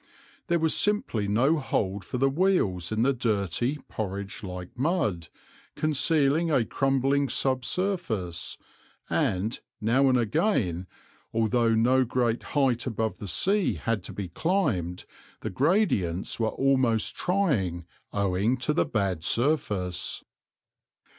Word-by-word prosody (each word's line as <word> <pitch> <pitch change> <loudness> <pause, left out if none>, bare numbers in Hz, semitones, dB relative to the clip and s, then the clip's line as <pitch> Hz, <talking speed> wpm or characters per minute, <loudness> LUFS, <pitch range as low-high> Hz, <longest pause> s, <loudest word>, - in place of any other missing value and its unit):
There 170 -2 +2
was 160 -1 +2
simply 205 - 0
no 130 +10 +2
hold 100 -7 -1
for - - -4
the 135 +2 +3
wheels 135 - +1
in 110 +1 +1
the 140 +2 +3
dirty, 115 - 0
porridge 100 -1 -5
like 90 -3 -7
mud, 130 - 0 0.5
concealing 155 +1 +2
a 130 -7 +2
crumbling 135 +1 +1
sub 130 -1 0
surface, 120 - -2 0.5
and, 100 +6 0 0.2
now 130 +5 +3
and 130 - +4
again, 110 - 0 0.4
although 115 0 +2
no 125 +4 +4
great 120 -1 0 0.2
height 130 -3 +2
above 110 -2 -2
the 100 - -6
sea 195 - +1
had 115 -3 -2
to - - -6
be 100 -2 -5
climbed, 100 - -1 0.4
the - - -4
gradients 125 - +1
were 110 - +1
almost 130 -5 +1
trying, 115 - 0 0.3
owing 100 +5 +1
to 130 +4 0
the 165 - +2
bad 95 -7 -1
surface. 105 - 0
120 Hz, 125 wpm, -27 LUFS, 100-140 Hz, 0.5 s, and